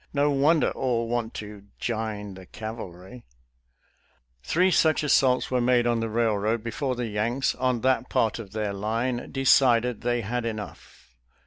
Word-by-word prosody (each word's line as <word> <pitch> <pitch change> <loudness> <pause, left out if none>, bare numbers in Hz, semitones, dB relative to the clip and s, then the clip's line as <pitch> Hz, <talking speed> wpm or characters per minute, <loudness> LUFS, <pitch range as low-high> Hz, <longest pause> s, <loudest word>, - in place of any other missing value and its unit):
No 145 0 +2
wonder 145 +3 +3
all 120 -3 -1
want 120 -1 -2
to 105 -1 -8
" - - -39
jine 110 -3 -4
the 95 -1 -12
cavalry 110 0 -8 0.6
"! - - -40
Three 180 - +2
such 160 -3 +3
assaults 130 -4 +3
were 125 -1 +2
made 120 0 +3
on 120 -1 +1
the 115 0 -2
railroad 110 0 0
before 125 +3 -2
the 120 0 -3
Yanks, 115 +5 -1
on 125 -2 -1
that 130 0 +1
part 110 +1 +1
of 105 -4 -9
their 105 -2 -2
line, 115 +5 -2
de 135 -1 -3
cided 125 -3 +4
they 120 0 0
had 120 +3 -3
enough. 110 - -8
115 Hz, 165 wpm, -26 LUFS, 105-125 Hz, 0.6 s, cided